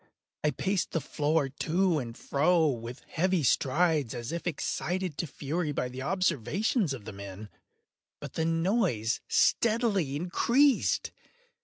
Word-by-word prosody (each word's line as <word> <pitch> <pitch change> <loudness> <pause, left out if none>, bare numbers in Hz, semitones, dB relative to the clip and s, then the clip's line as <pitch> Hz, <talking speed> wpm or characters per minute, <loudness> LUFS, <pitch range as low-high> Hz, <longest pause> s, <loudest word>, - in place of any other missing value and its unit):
I 150 - +3
paced 190 +4 -1
the 165 - +1
floor 150 0 0
to 165 +5 +1
and 115 -3 -6
fro 160 +4 +2
with 125 -3 -3
heavy 180 0 +1
strides, 145 0 +2
as 120 +2 -5
if 170 +1 -4
excited 175 +1 -2
to 170 - -1
fury 150 +3 -3
by 125 -3 -2
the 130 +1 -7
observations 185 - 0
of 125 -6 -6
the - - -7
men—but 100 +1 -12
the 160 - -1
noise 165 - +1
steadily 215 - +2
increased. 235 - +2
160 Hz, 130 wpm, -29 LUFS, 130-185 Hz, -, I